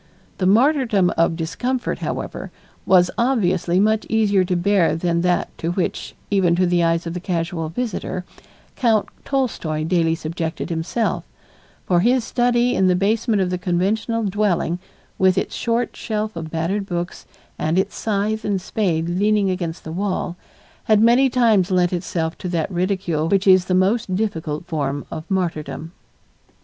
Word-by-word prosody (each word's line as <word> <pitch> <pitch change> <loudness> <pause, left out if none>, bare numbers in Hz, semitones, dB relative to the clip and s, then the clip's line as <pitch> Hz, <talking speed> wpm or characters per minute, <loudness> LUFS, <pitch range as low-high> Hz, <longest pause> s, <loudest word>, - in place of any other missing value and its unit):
The 185 - +2
martyrdom 225 - +3
of 165 0 +2
discomfort, 235 +11 -2
however, - - -4 0.4
was 180 -2 +5
obviously 185 -8 +2
much 215 +2 +2
easier 205 -4 +3
to 180 0 -1
bear 175 -2 +2
than 170 0 0
that 180 0 0
to 165 +1 -1
which, 180 -1 -3 0.2
even 185 -4 +3
to 180 +1 +2
the 175 -1 +2
eyes 165 0 +1
of 165 - -4
the 180 - -4
casual 170 -2 -2
visitor, 185 -2 -4 0.5
Count 225 -5 +2
Tolstoy 220 - -1
daily 165 -1 +1
subjected 165 +1 -4
himself, 170 +8 -1 0.6
for 175 -2 +3
his 245 +6 +3
study 245 0 +1
in 190 - +3
the 180 - +3
basement 210 +2 +1
of 180 - -2
the 180 - -2
conventional 210 +6 0
dwelling, 190 -4 0 0.4
with 185 -1 +4
its - - -1
short 235 0 -1
shelf 215 -1 -3
of 165 -1 -5
battered 175 +5 -2
books 175 -1 -4 0.3
and 160 +3 0
its 190 - 0
scythe 215 0 -1
and 200 -2 0
spade 175 -4 -1
leaning 200 +2 +2
against 170 -3 -4
the 160 - -7
wall, 185 -1 -2 0.5
had 215 -1 +4
many 240 +4 +5
times 225 -7 +3
lent 180 -1 +2
itself 170 -2 -2
to 180 - -4
that 170 +1 -1
ridicule 180 -3 -1
which 195 +1 +2
is 185 -2 +6
the 185 - 0
most 190 +1 +1
difficult 165 -7 -2
form 145 -4 -2
of 160 0 -7
martyrdom. 165 -4 -2
185 Hz, 160 wpm, -21 LUFS, 170-215 Hz, 0.6 s, is